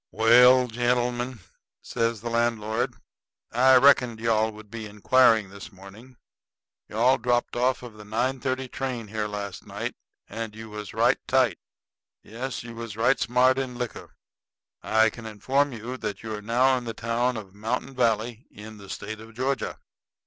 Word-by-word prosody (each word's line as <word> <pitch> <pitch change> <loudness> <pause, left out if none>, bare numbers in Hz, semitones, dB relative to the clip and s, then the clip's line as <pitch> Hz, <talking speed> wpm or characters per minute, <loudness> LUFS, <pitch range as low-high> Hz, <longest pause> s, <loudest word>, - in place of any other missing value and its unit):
"Well, 125 +4 +6
gentlemen," 120 0 -1 0.4
says 115 -2 -1
the 120 - -4
landlord, 115 +1 0 0.6
"I 130 +2 +5
reckoned 125 -3 +5
you 115 0 0
all 110 0 +2
would 105 -1 -14
be 115 -2 -6
inquiring 110 0 +3
this 100 +3 -10
morning. 105 +6 -14 0.7
You - - -10
all 130 +4 +4
dropped 120 +1 0
off 125 +1 +1
of 120 -3 -9
the 105 0 -12
nine 120 +5 -1
thirty 130 0 -2
train 125 -4 -4
here 110 0 -2
last 100 -2 -6
night; - - -4 0.3
and 110 -2 -6
you 110 -1 -9
was 105 -2 -7
right - - +3
tight. - - +2 0.6
Yes, 125 +4 -6
you 115 -1 -9
was 115 -2 -7
right 120 +4 +3
smart 130 +2 +3
in 130 -2 -4
liquor. 120 -1 -6 0.7
I 110 0 +3
can 115 0 -9
inform 135 +7 0
you 120 +2 -6
that 105 - -5
you 110 -1 -5
are 105 - -5
now 125 +5 +3
in 120 - -10
the 115 -2 -5
town 120 +2 -1
of 100 -3 -9
Mountain 115 +6 -3
Valley, 115 -1 0
in 110 +1 -11
the 100 -1 -13
State 105 +3 -6
of 110 0 -14
Georgia." 130 +1 -2
115 Hz, 170 wpm, -26 LUFS, 110-125 Hz, 0.7 s, Well